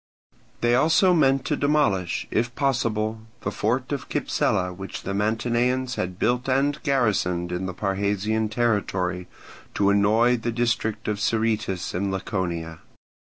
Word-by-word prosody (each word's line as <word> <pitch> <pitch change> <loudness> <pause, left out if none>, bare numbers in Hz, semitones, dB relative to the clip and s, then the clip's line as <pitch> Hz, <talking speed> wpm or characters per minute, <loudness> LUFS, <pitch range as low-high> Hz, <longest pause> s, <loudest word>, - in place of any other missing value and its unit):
They 120 0 +3
also 160 +8 +4
meant 135 -5 +3
to 150 - 0
demolish, 140 - +1
if 120 +2 0
possible, 110 -5 0 0.2
the 100 - -2
fort 125 +6 -1
of 140 -3 -4
Cypsela 90 -1 0
which 95 +1 -7
the 100 - -3
Mantineans 120 +5 0
had 90 -5 -3
built 125 +5 0
and 140 +3 +1
garrisoned 100 - 0
in 90 +1 -2
the 95 - -4
Parrhasian 105 +2 -1
territory, 95 -6 -1 0.5
to 100 0 +3
annoy 110 +5 +3
the 115 +1 -2
district 115 -2 -1
of 105 -1 -1
Sciritis 110 -4 -1
in 95 +3 -1
Laconia. 85 -4 -3
110 Hz, 135 wpm, -24 LUFS, 95-125 Hz, 0.5 s, also